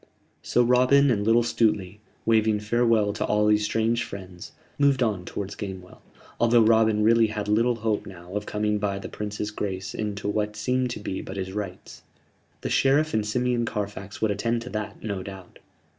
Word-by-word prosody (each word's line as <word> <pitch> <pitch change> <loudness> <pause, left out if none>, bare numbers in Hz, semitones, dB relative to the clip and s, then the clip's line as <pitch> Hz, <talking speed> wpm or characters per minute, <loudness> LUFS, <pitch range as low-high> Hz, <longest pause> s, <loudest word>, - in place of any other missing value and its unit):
So 125 - +2
Robin 130 +3 +4
and 105 -4 +1
little 115 +2 +4
Stuteley, 105 -4 0 0.3
waving 110 -1 +3
farewell 110 -1 +2
to 105 - -2
all 105 0 +2
these 105 0 +3
strange 115 +2 +1
friends, 95 +1 -9 0.3
moved 140 -3 +4
on 100 -6 -1
towards 100 +1 -5
Gamewell, 95 -3 -8 0.4
although 120 0 +5
Robin 110 -1 +4
really 115 +1 +5
had 105 -1 -4
little 115 +3 +2
hope 110 -2 -2
now 90 -1 -11
of 105 0 -3
coming 105 0 0
by 100 -1 -1
the 100 - -7
Prince's 105 0 -4
grace 95 -2 -4
into 105 -1 -4
what 105 0 -1
seemed 125 +3 0
to 120 - -5
be 95 -2 -4
but 95 - -8
his 95 -1 -4
rights. 100 -3 -6 0.6
The - - -3
Sheriff 145 +3 +3
and 110 - +1
Simeon 120 +2 0
Carfax 100 -2 -5
would 110 - +3
attend 115 +3 -1
to 125 - -8
that, 105 -1 -5
no 100 -3 -3
doubt. 95 -2 -10
105 Hz, 180 wpm, -25 LUFS, 100-115 Hz, 0.6 s, although